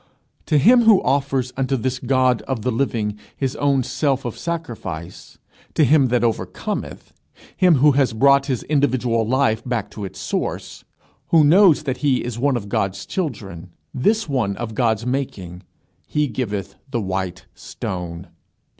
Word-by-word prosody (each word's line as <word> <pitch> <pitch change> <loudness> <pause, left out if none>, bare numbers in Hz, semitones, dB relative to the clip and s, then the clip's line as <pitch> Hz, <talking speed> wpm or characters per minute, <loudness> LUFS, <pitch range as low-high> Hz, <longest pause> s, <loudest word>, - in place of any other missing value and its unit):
To 150 - +3
him 240 - +5
who 215 -4 +7
offers 135 -2 0
unto 135 0 0
this 130 +2 -2
God 130 -1 +2
of 130 -5 -3
the 125 - 0
living 110 -4 -1 0.2
his 135 -2 -2
own 140 -2 +2
self 135 0 -1
of 120 - -4
sacrifice, 110 - -6 0.4
to 155 - +4
him 140 -1 +4
that 120 -1 +1
overcometh, 115 -2 -3 0.4
him 180 -3 +4
who 145 +2 +5
has 135 -2 +2
brought 140 +4 +4
his 130 -4 -2
individual 125 -6 +1
life 130 -3 +1
back 120 -5 -3
to 105 - -7
its 95 - -7
source, - - -4 0.4
who 160 -2 +5
knows 170 +1 +5
that 135 -3 -2
he 135 -4 +1
is 120 -1 -5
one 135 0 +2
of 105 -3 -7
God's 95 0 -2
children, 100 - -5 0.2
this 210 - +1
one 120 -9 -1
of 120 -2 -4
the 130 - -2
Father's 115 -1 +1
making, 100 -10 -4 0.5
he 150 0 0
giveth 105 -6 -4 0.2
the 125 -4 -1
white 95 -3 -4
stone. 90 -1 -6
125 Hz, 160 wpm, -21 LUFS, 110-140 Hz, 0.5 s, who